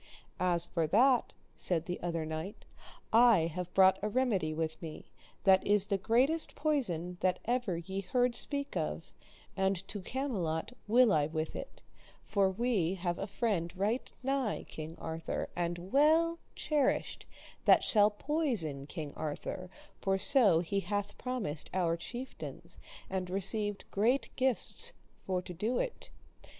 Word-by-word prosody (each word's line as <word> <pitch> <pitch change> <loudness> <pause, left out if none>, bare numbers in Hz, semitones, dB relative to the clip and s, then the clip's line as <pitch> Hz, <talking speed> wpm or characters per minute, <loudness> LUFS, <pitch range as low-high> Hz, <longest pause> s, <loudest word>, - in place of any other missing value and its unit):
As 175 -2 +1
for 165 -3 -1
that, 245 - +4 0.2
said 170 -2 +1
the 180 0 -4
other 170 -2 -2
knight, 160 +5 -6 0.5
I 230 -5 +7
have 180 0 -4
brought 190 0 +6
a 210 - -1
remedy 210 -9 +1
with 160 0 -3
me, 160 -2 -8 0.3
that 190 -1 +5
is 205 -1 +3
the 200 - +2
greatest 255 - +2
poison 180 - -1
that 185 -1 +2
ever 240 -7 0
ye 190 +3 -4
heard 245 +5 +1
speak 280 +4 -1
of, 75 +1 -3 0.4
and 190 -1 0
to 205 - -5
Camelot 205 - -2 0.2
will 235 0 +5
I 150 -2 +3
with 155 0 -3
it, - - -8 0.4
for 200 -2 +2
we 195 -4 0
have 175 -1 -2
a 195 - -3
friend 195 -6 -1
right 215 +6 -1
nigh 270 -4 0
King 160 +1 -7
Arthur, 160 0 -4
and 175 +1 -3
well 320 +4 +4 0.2
cherished, 295 -4 0 0.4
that - - +6
shall 210 -2 +5
poison 210 - -1
King 150 -1 -6
Arthur; 155 +4 -5 0.3
for 195 -1 +1
so 195 - +4
he 195 +3 -1
hath 205 +1 -3
promised 230 - -3
our 170 -3 +2
chieftains, 245 +10 -8 0.3
and 185 -1 -3
received 200 +2 0
great 230 +4 +1
gifts 265 - +1 0.3
for 185 -1 0
to 180 - -8
do 215 +8 -1
it. - - -3
195 Hz, 145 wpm, -32 LUFS, 170-245 Hz, 0.5 s, I